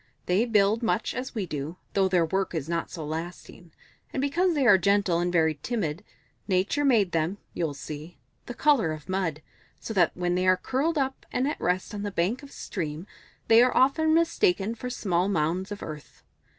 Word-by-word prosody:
They 190 +6 +2
build 215 -1 +3
much 225 -1 0
as 255 0 -5
we 210 -4 -1
do, 155 +1 -5 0.2
though 195 -1 +3
their 180 -3 +2
work 190 +2 -1
is 155 -3 -3
not 170 0 -2
so 160 -4 -6
lasting. 165 +2 -7 0.4
And - - -3
because 335 +6 +1
they 280 -3 +2
are 200 -5 +7
gentle 200 -2 +2
and 175 0 0
very 160 -3 +2
timid, 195 -7 -2 0.4
Nature 195 +9 +1
made 225 -10 +3
them, 165 +4 0 0.2
you'll 160 -4 -2
see, 150 +4 -8 0.3
the 245 - -6
colour 255 - +3
of 155 -2 -10
mud, 180 -5 -2 0.4
so 225 - -6
that 175 -5 +2
when 175 0 0
they 185 +1 +1
are 185 0 +5
curled 285 - -1
up 265 -1 -2
and 260 - 0
at 300 - -3
rest 180 +3 -1
on 205 - -4
the 205 - -2
bank 195 +7 -1
of 280 - -12
a - - -20
stream, 160 -2 -5 0.4
they 225 +1 +7
are 250 0 +3
often 315 +5 +3
mistaken 225 - +2
for; 250 +2 -6
small 185 -6 0
mounds 180 +2 -1
of 205 - -6
earth. 150 -2 -9
190 Hz, 200 wpm, -27 LUFS, 170-235 Hz, 0.4 s, are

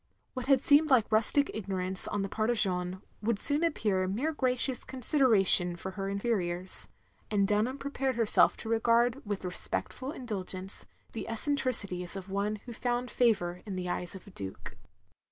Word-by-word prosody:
What 255 -1 -6
had 270 -2 +4
seemed 300 +2 +4
like 250 -6 +3
rustic 225 +6 +2
ignorance 190 -3 -3
on 205 -1 -2
the - - -2
part 215 +3 -2
of 240 - +1
Jeanne, 180 -2 -2 0.2
wotdd 225 0 0
soon 290 +8 +7
appear 205 - 0
mere 255 +12 -2
gracious 255 -2 -1
consideration 225 - +5
for 190 +2 -7
her 195 +1 -5
inferiors; 190 -4 -3 0.4
and 200 -2 +1
Dunham 215 +6 0
prepared 270 -2 -3
herself 230 -2 +4
to - - -9
regard 235 +3 +2
with 205 -2 -4
respectful 255 +8 -4
indtd 220 - -6
gence 185 +2 -4 0.3
the 225 - -6
eccentricities 225 -8 -1
of 195 0 -8
one 200 +2 -1
who 245 - -8
had 230 - -12
found 245 0 -1
favotir 185 -7 0
in 195 - -5
the 180 -1 -4
eyes 180 +1 -4
of 190 - -11
a 200 - -14
Duke. 95 - -8
215 Hz, 170 wpm, -29 LUFS, 190-250 Hz, 0.4 s, soon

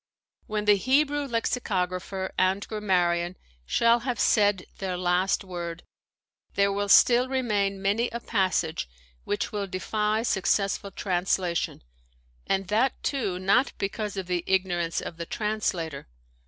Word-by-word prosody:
— - - -39
^When 210 -1 -1
the 205 -1 +6
Hebrew 285 +5 +2
lexicographer 190 -6 -2
and 190 +2 +1
grammarian 180 -4 0 0.3
shall 235 - +4
have 245 0 -3
said 205 -4 +3
their 185 -2 -2
last 180 +2 +1
word, 175 -2 -6 0.7
there 200 0 +3
will 205 0 -2
still 245 +4 +6
remain 210 -7 0
many 205 +5 +1
a 235 - -5
passage 185 - 0 0.4
which 205 - -2
will 205 -2 -3
defy 210 +4 -1
successful 200 -2 0
translation 180 - -1 0.3
— - - -36
and 195 -1 0
that, 230 +6 +2
too, 215 -10 -1
not 200 +8 +2
because 205 +1 -3
of 190 - -3
the 175 -1 -1
ignorance 175 -3 0
of 165 - -7
the 170 - -5
translator. 185 -9 -2
195 Hz, 135 wpm, -26 LUFS, 180-215 Hz, 0.7 s, the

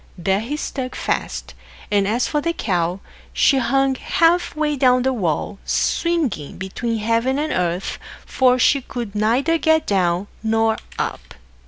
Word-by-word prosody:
There 190 +3 +1
he 250 +8 -4
stuck 260 -4 -4
fast; - - -3 0.4
and 200 -1 +2
as 235 +4 +1
for 295 - -1
the 335 +2 -1
cow, 180 - -1 0.3
she 275 - +4
hung 270 +1 +2
half 335 +5 +1
way 305 -1 0
down 255 -2 +3
the 265 0 +1
wall, 195 - -2
swinging 300 - -1
between 225 +5 -3
heaven 230 +5 +1
and 305 +1 -1
earth, 180 +1 -2 0.3
for 255 -1 +3
she 275 +2 +3
could 240 -5 -6
neither 245 +10 +1
get 315 0 +3
down 180 -1 +1 0.2
nor 225 0 +1 0.2
up. - - -4
240 Hz, 150 wpm, -21 LUFS, 200-280 Hz, 0.4 s, she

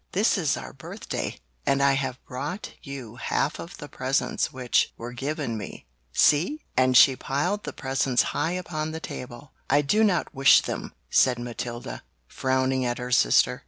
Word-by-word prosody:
"This - - +3
is - - +1
our 65 -1 -8
birthday - - -5 0.3
and 140 - +2
I 140 0 +4
have 130 -2 -2
brought 145 +10 -5
you 130 -6 -8
half 145 +3 -1
of 170 - -8
the 145 - -8
presents 130 0 -1
which 125 -2 +1
were 120 +1 -7
given 135 -3 -3
me! 105 - -8 0.3
See?" 175 - +3
and 130 0 +4
she 135 - +8
piled 175 +12 -1
the - - -4
presents 135 -2 +1
high 160 +4 0
upon 160 -4 -3
the 160 - -4
table. 125 -2 -8 0.2
"I 145 +2 +4
do 210 +10 +3
not 195 -5 +1
wish 135 0 +6
them!" - - -5 0.2
said 125 -2 +4
Matilda, 120 - -6 0.3
frowning 130 0 0
at 120 -1 -1
her 125 0 -5
sister. - - +4
135 Hz, 165 wpm, -26 LUFS, 125-150 Hz, 0.3 s, she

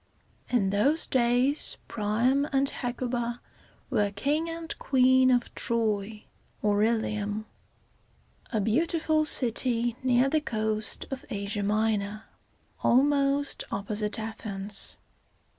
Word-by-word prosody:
In 205 -6 +2
those 275 +11 +2
days, 250 +3 +2
Pri´am 235 +7 +1
and 275 0 +2
Hec´u 245 0 -3
ba 240 0 -2 0.5
were 205 -1 +2
King 290 +11 -1
and 330 0 -5
Queen 260 -1 +4
of 245 -1 +1
Troy 215 -2 -1 0.4
(or 205 -1 +2
Il´i 220 -1 +1
um), 210 +1 -3 1.1
a 220 - 0
beautiful 310 +7 +1
city 240 -3 +2
near 255 0 +3
the 310 +2 +1
coast 215 -4 -2
of 270 -1 -5
Asia 200 +1 -3
Minor, 210 0 0 0.6
almost 280 +2 +2
opposite 210 +1 -2
Athens. 210 -2 -4
235 Hz, 110 wpm, -28 LUFS, 210-270 Hz, 1.1 s, Queen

